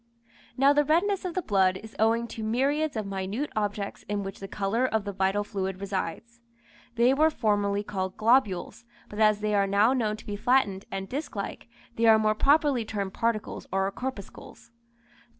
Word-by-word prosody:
Now 275 +2 +5
the 295 0 +3
redness 360 +7 +1
of 355 - -4
the 370 - -1
blood 190 -4 +2
is 220 +3 -12
owing 225 +2 +2
to 225 - -7
myriads 275 +7 0
of 215 - -2
minute 195 +8 -3
objects 205 -1 -3
in 205 -1 -1
which 195 0 -7
the 195 - -7
colour 205 +5 -1
of 220 -5 0
the 200 - -3
vital 195 +1 0
fluid 190 -2 -4
resides. 200 +4 -5 0.5
They 240 +2 +4
were 310 +3 +4
formerly 205 -6 0
called 190 -2 -4
globules, 225 -4 +1 0.3
but 210 - -8
as 215 -1 +4
they 210 0 0
are 200 -1 +3
now 205 +5 +3
known 220 -5 -1
to - - -14
be 205 - -4
flattened 205 -4 +1
and 195 0 -4
disc 280 +5 -5
like, 200 +3 -6 0.3
they 230 0 +3
are 220 -1 +8
more 215 0 +2
properly 280 +1 +3
termed 200 -3 -4
particles 230 -2 -2
or 195 +1 0
corpuscles. 235 -1 -8
215 Hz, 185 wpm, -27 LUFS, 200-250 Hz, 0.5 s, are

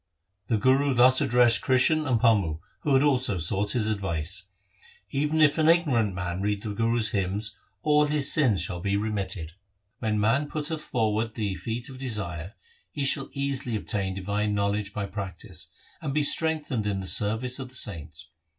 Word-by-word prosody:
The 115 - +1
Guru 130 +4 +2
thus 130 +2 +6
addressed 120 -3 +4
Krishan 145 +4 +2
and 125 -3 +2
Pammu 100 -10 +2 0.2
who 135 -3 +2
also 130 -6 +3
had 85 -4 -3
sought 100 +5 0
his 120 -4 0
advice: 95 -3 -2 0.3
' - - -24 0.3
Even 150 +3 0
if 150 +1 +4
an 155 0 +4
ignorant 130 - +2
man 90 0 -3
read 105 0 -1
the 105 -2 -4
Guru's 115 +1 +1
hymns, 100 +2 -2 0.3
all 150 -1 +3
his 145 -1 +2
sins 125 - +3
shall 90 - -3
be 100 +2 0
remitted. 100 -6 -3 0.5
When 110 -2 -1
man 130 +8 +1
putteth 155 0 -3
forward 110 -1 -1
the 105 -4 -2
feet 115 +5 -5
of 130 -1 -10
desire, 100 -7 -4 0.4
he 145 -2 -2
shall 135 0 +1
easily 140 -4 -2
obtain 100 -2 -2
divine 105 +2 -1
knowledge 100 0 -1
by 100 -1 -3
practice, 95 -4 -6 0.3
and 145 -3 -3
be 150 - +2
strengthened 150 -8 +1
in 100 -2 -1
the 95 - -6
service 115 +7 +1
of 130 -1 -6
the 130 - -11
saints. 80 - -2
110 Hz, 175 wpm, -26 LUFS, 100-135 Hz, 0.5 s, thus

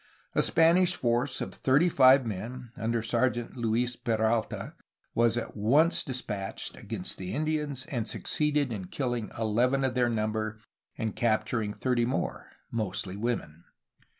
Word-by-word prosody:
A - - +3
Spanish 175 +2 +4
force 120 +2 0
of - - -4
thirty 140 +6 +3
five 130 -4 +6
men, 115 +4 -5
under 115 0 -1
Sergeant 120 +1 0
Luis 120 +1 0
Peralta, 110 -1 -1 0.4
was 115 0 +3
at 120 - -4
once 140 - +3
despatched 105 -7 -3
against - - -4
the 95 -1 -4
Indians, 150 -3 -1
and 120 -5 -3
succeeded 150 -4 0
in 95 -4 -5
killing 120 0 -2
eleven 120 +5 +2
of 130 -1 +1
their 120 -1 +2
number 110 -1 -1 0.4
and 110 -2 -2
capturing 110 -2 0
thirty 120 +1 0
more, 130 +3 -2 0.2
mostly 100 -4 -3
women. 100 -8 -3
120 Hz, 135 wpm, -29 LUFS, 110-130 Hz, 0.4 s, five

